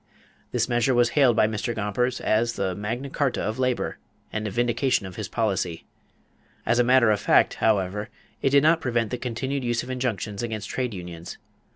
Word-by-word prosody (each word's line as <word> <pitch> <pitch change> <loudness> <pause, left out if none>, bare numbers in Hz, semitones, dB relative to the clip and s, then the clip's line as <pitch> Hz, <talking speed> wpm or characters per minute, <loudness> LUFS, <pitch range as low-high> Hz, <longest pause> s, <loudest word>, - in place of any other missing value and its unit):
This 115 -2 +1
measure 120 +1 +2
was 120 0 +4
hailed 130 -5 +4
by 110 - +4
Mr. 110 +2 -3
Gompers 115 +4 -1
as 115 +2 +1
the 95 -3 -1
"Magna 115 +8 -4
Carta 140 -1 -1
of 110 +4 -3
Labor" 125 -1 -1 0.3
and 110 0 -2
a - - -2
vindication 120 +1 +1
of 95 - -8
his 110 -4 -4
policy. 95 -6 -2 0.8
As 120 +1 +2
a - - +6
matter 125 -2 +5
of 105 - +1
fact, - - +4
however, 105 -1 +1 0.3
it - - +3
did 140 +1 +5
not 165 +1 +4
prevent 120 -5 0
the 125 - -3
continued 130 +3 -3
use 120 -1 0
of 130 - -6
injunctions 110 -5 -2
against 110 -3 -4
trade 125 -5 -2
unions. 85 -1 -8
115 Hz, 190 wpm, -25 LUFS, 105-125 Hz, 0.8 s, a